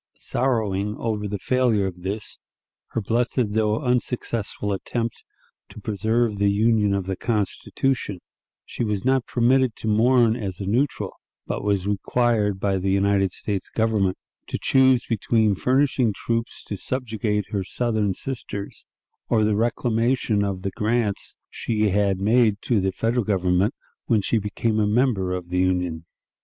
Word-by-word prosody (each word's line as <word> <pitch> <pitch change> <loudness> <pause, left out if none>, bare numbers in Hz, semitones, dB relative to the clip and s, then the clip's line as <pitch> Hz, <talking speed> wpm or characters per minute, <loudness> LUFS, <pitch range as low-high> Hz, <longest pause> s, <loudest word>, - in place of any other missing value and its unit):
Sorrowing 105 -5 0
over 105 -2 -2
the 100 0 -3
failure 120 -3 +2
of 90 -2 -5
this, 100 +4 -5 0.5
her 115 - -3
blessed 115 0 0
though 110 0 +1
unsuccessful 120 -4 -1
attempt 115 +4 -3 0.5
to - - -11
preserve 110 +1 0
the 100 0 +3
Union 105 0 +3
of 95 -2 -2
the 95 0 -2
Constitution, 105 +1 -1 0.5
she - - -4
was 105 0 -2
not 130 -1 +2
permitted 125 0 +2
to - - -6
mourn 115 +1 +4
as 100 -7 -4
a 100 - -4
neutral, 125 +8 0 0.3
but - - -3
was 100 -2 +1
required 105 0 +1
by 100 -1 +1
the 95 +1 -1
United 95 0 +2
States 100 0 -4
Government 110 -4 +1 0.3
to - - -3
choose 130 -2 +4
between 110 -1 +2
furnishing 130 +1 +2
troops 115 +3 -2
to 100 - -5
subjugate 110 -4 -2
her 100 -2 -1
Southern 105 -1 -1
sisters 115 -6 -6 0.4
or 110 -2 +3
the 105 0 +2
reclamation 115 -1 +1
of 95 -2 -3
the 100 - -2
grants 110 -1 0 0.2
she 110 -2 0
had 100 -1 +1
made 110 0 +3
to 115 -4 +2
the 95 0 0
Federal 115 +4 0
Government 95 +2 +1 0.3
when 110 -4 +2
she 115 - +1
became 110 +2 -1
a 105 - +2
member 105 -4 +1
of 90 -1 -4
the 90 +1 0
Union. 90 -3 0
105 Hz, 150 wpm, -24 LUFS, 100-120 Hz, 0.5 s, mourn